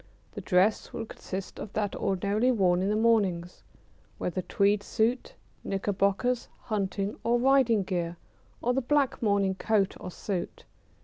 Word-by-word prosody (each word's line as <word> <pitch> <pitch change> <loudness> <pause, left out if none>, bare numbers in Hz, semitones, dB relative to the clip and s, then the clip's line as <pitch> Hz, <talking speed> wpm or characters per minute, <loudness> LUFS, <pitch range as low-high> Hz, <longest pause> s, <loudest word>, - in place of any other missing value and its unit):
The - - -7
dress 190 +4 +2
would 225 - -5
consist 190 0 -7
of 210 - -7
that 210 -1 -1
ordinarily 200 +5 +1
worn 185 -6 +2
in 195 - 0
the 210 - +1
mornings, 200 -6 +1 0.6
whether 180 +1 -2
tweed 200 +3 +2
suit, 225 +4 -1 0.3
knickerbockers, 200 +5 0
hunting 200 -2 -2
or 235 +1 +3
riding 245 -4 +4
gear, 175 -2 -3 0.5
or 245 - +2
the 270 - +1
black 280 +1 +1
morning 200 -3 +2
coat 200 0 +1
or - - -6
suit. 180 0 -5
205 Hz, 140 wpm, -28 LUFS, 190-230 Hz, 0.6 s, riding